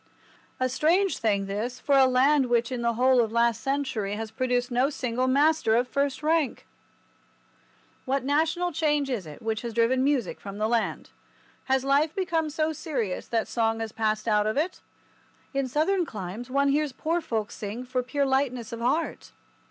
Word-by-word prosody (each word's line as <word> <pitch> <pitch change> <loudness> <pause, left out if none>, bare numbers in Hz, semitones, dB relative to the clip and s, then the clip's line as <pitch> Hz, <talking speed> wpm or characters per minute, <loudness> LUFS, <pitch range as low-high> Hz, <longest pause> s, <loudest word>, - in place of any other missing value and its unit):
A 255 - +2
strange 340 +9 +2
thing 200 -3 +1
this 220 +6 -4
for 285 - +2
a 265 -1 +6
land 265 +2 +3
which 235 0 +1
in 250 -2 -3
the 235 0 +1
whole 255 +1 +4
of 225 -2 -1
last 235 -1 +2
century 260 -8 -2
has 220 0 -5
produced 250 +1 -1
no 250 +3 +2
single 255 -3 -1
master 280 -3 +3
of 245 +2 +3
the - - -28
first 280 0 0
rank! 315 -3 +1 1.4
What 270 0 0
national 320 +5 +1
change 295 -3 0
is 205 -9 -3
it 150 +5 -11
which 220 0 -2
has 235 -2 -6
driven 245 +3 +3
music 275 -4 0
from 200 0 -8
the 215 +1 0
land? 230 0 -1 0.5
Has 265 0 +1
life 290 +3 +2
become 330 -5 0
so 310 +1 -1
serious 255 - -3
that 225 -2 -1
song 225 -1 0
has 225 -1 -4
passed 215 0 -1
out 210 -1 +3
of 215 - -1
it? 330 +5 -1 0.7
In 275 -1 0
Southern 320 +8 +1
climes 215 - -6
one 280 +2 +2
hears 295 -1 +1
poor 330 +6 -1
folk 220 -8 -3
sing 215 +4 -6
for 255 0 -1
pure 280 +3 -1
lightness 265 -4 0
of 230 - -5
heart. 270 +8 -1
255 Hz, 185 wpm, -26 LUFS, 230-285 Hz, 1.4 s, a